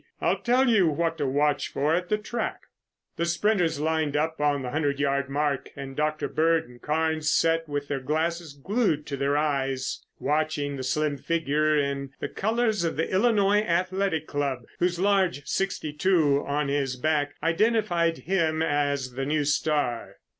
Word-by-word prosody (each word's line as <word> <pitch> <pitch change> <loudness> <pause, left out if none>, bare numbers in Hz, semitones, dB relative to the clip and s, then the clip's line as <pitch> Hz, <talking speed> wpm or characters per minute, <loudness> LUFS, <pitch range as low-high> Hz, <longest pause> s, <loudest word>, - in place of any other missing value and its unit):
I'll - - +1
tell 255 +2 +3
you 215 -7 +4
what 165 +1 -1
to 145 - 0
watch 145 +2 +1
for 150 +3 +1
at 180 +1 -1
the 210 - +2
track." 220 +2 -4 0.6
The 170 - 0
sprinters 170 -3 +1
lined 155 -1 0
up 160 0 -1
on 145 -2 +1
the 125 - -4
hundred 145 -2 0
yard 140 -1 0
mark 145 -1 -1
and 135 -1 -7
Dr. 155 +1 -1
Bird 165 +1 +1
and 120 0 -16
Carnes 155 0 0
sat 165 -1 +2
with 145 0 -3
their 140 -1 -2
glasses 160 +3 -2
glued 165 - 0
to 140 - -4
their 140 +1 0
eyes 135 -3 -1
watching 150 -1 -1
the 135 - -5
slim 145 +2 0
figure 155 0 +1
in 140 -1 -2
the - - -3
colors 220 -2 0
of 165 - -2
the 160 - -1
Illinois 205 0 +3
Athletic 185 -3 0
Club, 140 -5 -2 0.2
whose 175 0 +1
large 190 -7 +1
"62" 155 -2 +1
on 145 +1 0
his 140 -2 -1
back 145 +2 0
identified 175 -2 +2
him 160 -4 0
as 145 -4 0
the 135 +2 -3
new 150 0 +1
star. 145 -4 0
155 Hz, 165 wpm, -26 LUFS, 145-170 Hz, 0.6 s, you